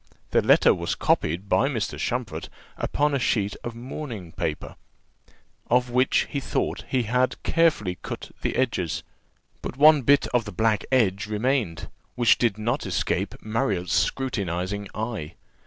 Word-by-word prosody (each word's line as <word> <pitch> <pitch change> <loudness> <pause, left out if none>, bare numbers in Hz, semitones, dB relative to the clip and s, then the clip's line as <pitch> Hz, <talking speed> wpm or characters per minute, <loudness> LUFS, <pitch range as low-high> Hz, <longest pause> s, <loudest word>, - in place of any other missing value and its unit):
The - - +4
letter - - +5
was - - -2
copied 90 +6 0
by 135 - +3
Mr. 115 -7 -2
Champfort 120 -4 -3 0.3
upon 150 0 0
a 140 - +1
sheet 105 -4 0
of 120 -1 -5
mourning 120 - -7
paper, 80 -1 -4 0.9
off 125 0 +2
which 125 +1 +3
he 140 - -1
thought - - -2
that - - -12
he 130 -2 +1
had 125 +3 0
carefully 145 - +2
cut - - -7
the - - -1
edges; 110 -10 -1 0.6
but 125 - -6
one 150 0 +7
bit 140 +3 +4
of 120 -3 +2
the 105 - -6
black 110 -2 +1
edge 110 -5 +2
remained, 110 -4 -1 0.3
which 120 -2 +4
did 115 -4 +1
not 115 +3 -1
escape 90 - -1
Marriott's 110 -5 -1
scrutinizing 100 -6 -1
eye. 110 -8 -4
115 Hz, 150 wpm, -25 LUFS, 100-130 Hz, 0.9 s, one